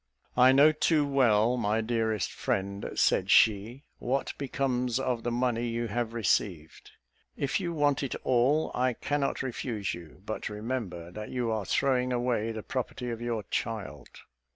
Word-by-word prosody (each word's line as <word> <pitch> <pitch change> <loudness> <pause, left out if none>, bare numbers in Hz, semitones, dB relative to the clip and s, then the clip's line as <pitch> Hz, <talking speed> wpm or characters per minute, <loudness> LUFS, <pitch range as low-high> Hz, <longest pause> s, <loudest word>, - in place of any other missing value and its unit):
"I 125 +1 +7
know 140 +3 +7
too 155 -1 +2
well, 125 -4 +3
my 110 -2 +1
dearest 110 -2 -1
friend," 100 +1 -2
said - - +2
she, 110 +6 +4 0.2
"what 135 +3 -1
becomes 130 -3 -1
of 125 -3 -1
the 120 - -2
money 120 -1 0
you 115 0 -2
have 115 +1 -2
received. 90 -7 -1 0.4
If 140 +5 0
you 175 -3 -2
want 145 -4 +1
it 140 - -3
all, 130 +5 +2
I 125 0 +1
cannot 140 +3 -1
refuse 115 -5 -3
you; 85 +1 -11
but 110 - -4
remember 105 -6 -4
that 105 +3 -7
you 120 -3 -1
are 110 -3 -2
throwing 125 0 +1
away 120 -2 0
the 110 -1 -6
property 125 -1 -4
of 115 0 -5
your 115 -3 -2
child." 110 -4 -3
120 Hz, 155 wpm, -29 LUFS, 110-130 Hz, 0.4 s, I